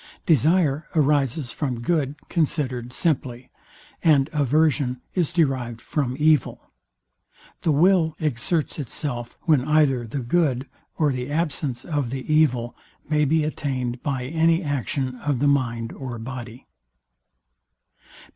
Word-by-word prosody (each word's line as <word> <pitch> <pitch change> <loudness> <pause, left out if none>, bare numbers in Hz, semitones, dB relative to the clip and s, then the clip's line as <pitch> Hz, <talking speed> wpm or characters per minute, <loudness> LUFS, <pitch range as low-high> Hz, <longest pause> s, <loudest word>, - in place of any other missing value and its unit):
DESIRE 155 0 +3
arises 145 -3 +1
from 130 -6 -3
good 145 0 0
considered 135 -7 -1
simply, 130 -5 -2 0.5
and 150 -4 +4
AVERSION 145 -2 +2
is 175 -5 0
derived 130 -8 0
from 130 -1 -2
evil. 155 -2 +1 0.9
The 160 - +2
WILL 160 +1 +3
exerts 155 +3 -1
itself, 120 -3 -5
when 150 -7 +3
either 140 -5 +2
the 120 - -5
good 135 0 +1 0.3
or 150 -3 +2
the 125 +1 -4
absence 145 -5 -2
of 145 -7 -1
the 130 +1 -5
evil 125 -6 +2 0.3
may 150 -1 +3
be 155 +2 +2
attained 130 -5 -3
by 135 -4 -2
any 165 +4 +2
action 130 - -2
of 145 -3 -1
the 145 +4 +2
mind 120 -5 0
or 130 -3 -6
body. 120 0 -8
140 Hz, 120 wpm, -24 LUFS, 125-155 Hz, 0.9 s, and